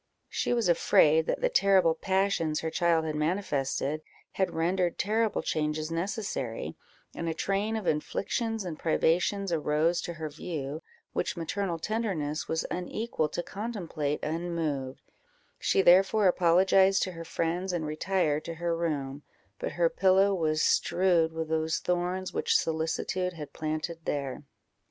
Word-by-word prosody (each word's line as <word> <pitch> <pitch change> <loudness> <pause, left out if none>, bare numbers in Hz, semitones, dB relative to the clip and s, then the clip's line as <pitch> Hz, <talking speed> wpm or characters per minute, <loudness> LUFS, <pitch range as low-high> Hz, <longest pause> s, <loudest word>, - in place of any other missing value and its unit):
She - - -1
was 235 -4 +2
afraid 160 -2 +4
that - - -1
the - - +2
terrible 190 - +4
passions 190 -3 0
her 160 - -3
child 165 -2 +2
had 155 - -2
manifested, 150 -3 -1 0.3
had 190 - 0
rendered 175 +2 0
terrible 220 +1 0
changes 155 +1 -1
necessary, 165 - -3 0.4
and 170 - -3
a 160 - -2
train 200 +5 -1
of 220 -3 -3
inflictions 220 +8 -1
and 160 -4 -5
privations 175 +4 +1
arose 160 +2 +1
to 170 - -5
her 160 -1 -5
view, 150 -1 -5 0.3
which - - -2
maternal 170 +1 -2
tenderness 165 -7 -2
was 160 0 -1
unequal 180 -2 -2
to 175 - -3
contemplate 175 -10 -3
unmoved; 155 -5 -3 0.6
she 195 - +2
therefore 195 +3 +5
apologized 190 +2 +4
to 185 - -3
her 165 -1 -8
friends, 170 +3 -2
and 170 -3 -2
retired 155 -1 0
to 165 - -5
her 170 0 -1
room, 145 -4 -2 0.4
but - - -3
her 170 -1 +3
pillow 190 +3 +3
was 155 -4 +1
strewed 175 -3 +3
with 160 0 -4
those 160 0 0
thorns 180 +1 -2
which - - +2
solicitude 165 +3 -1
had 150 -4 -8
planted 155 +2 -3
there. 140 -2 -2
170 Hz, 140 wpm, -29 LUFS, 155-190 Hz, 0.6 s, therefore